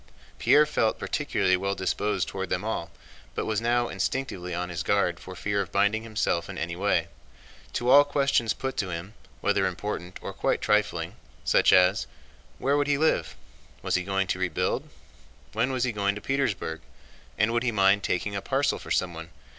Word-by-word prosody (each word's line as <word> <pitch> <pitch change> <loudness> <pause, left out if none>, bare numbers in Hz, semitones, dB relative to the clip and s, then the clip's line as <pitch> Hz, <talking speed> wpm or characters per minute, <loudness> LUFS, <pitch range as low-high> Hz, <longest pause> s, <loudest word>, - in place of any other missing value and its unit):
Pierre 150 +1 +6
felt 115 -7 +1
particularly 95 -1 +1
well 100 +2 -1
disposed 95 0 -1
toward 95 -1 -4
them 90 - -1
all, 85 -7 -2 0.5
but - - -2
was 110 -1 0
now 120 +1 +2
instinctively 95 -3 -3
on 90 +1 -3
his 85 -2 -3
guard 100 -4 +1
for 95 - -9
fear 100 +2 -1
of 90 - -6
binding 105 +2 +2
himself 110 -6 -1
in 95 - -6
any 85 +1 -3
way. 90 -3 +1 0.7
To 120 - -2
all 140 +3 +8
questions 140 -5 +1
put 135 +2 -3
to 95 - -1
him—whether 90 +5 -3
important 90 -4 -5
or - - -5
quite - - 0
trifling—such - - +1
as: 95 +2 +4 0.5
Where 140 +2 +1
would 145 0 +1
he 145 -1 +2
live? 160 +2 +1 0.5
Was - - -1
he 90 - +3
going 95 +1 0
to 95 - -1
rebuild? 90 -4 -1 0.6
When 115 +4 +1
was 130 -2 0
he 125 - +1
going 100 -1 0
to - - -5
Petersburg 110 -12 -1 0.6
and 110 +2 +2
would 120 - +2
he 125 -1 +1
mind 100 -1 +4
taking 100 +2 -1
a 100 - -2
parcel 135 +5 0
for - - -10
someone? 85 -2 -1
100 Hz, 180 wpm, -27 LUFS, 90-120 Hz, 0.7 s, all